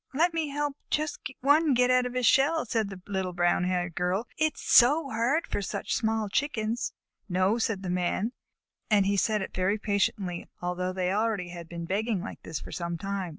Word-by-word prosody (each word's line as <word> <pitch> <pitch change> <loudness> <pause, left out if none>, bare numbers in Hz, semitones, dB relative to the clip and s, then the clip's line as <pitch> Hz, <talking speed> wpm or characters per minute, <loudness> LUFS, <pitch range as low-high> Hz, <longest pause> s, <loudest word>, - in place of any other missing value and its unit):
"Let 335 +4 +3
me 325 -2 0
help 290 0 -2
just 305 0 -1 0.2
one 290 +1 +4
get 250 +1 +4
out 250 0 +3
of 250 - -8
his 250 -1 +1
shell," 300 +7 +4
said 220 -3 -1
the 195 - -7
brown 180 -2 0
haired 180 -1 0
Little 180 +4 0
Girl. - - -34
"It 310 0 +1
is - - -12
so 275 +4 +5
hard 245 +9 +1
for - - -3
such 195 - -3
small 220 -1 0
Chickens." 230 0 -1 0.4
"No," 185 +5 +2
said 210 -4 -1
the 185 - -3
Man, 180 +5 0 0.6
and 205 -3 +4
he 200 +1 +2
said 210 +1 +1
it - - -7
very 185 +3 +1
patiently, 200 -4 -1
although 180 +1 -2
they 185 -1 -1
had 195 - 0
already 180 -6 -2
been 170 -1 -5
begging 205 +4 0
like 205 - -7
this 160 - -5
for - - -10
some 170 -1 -3
time. 195 0 -3
210 Hz, 200 wpm, -28 LUFS, 185-250 Hz, 0.6 s, so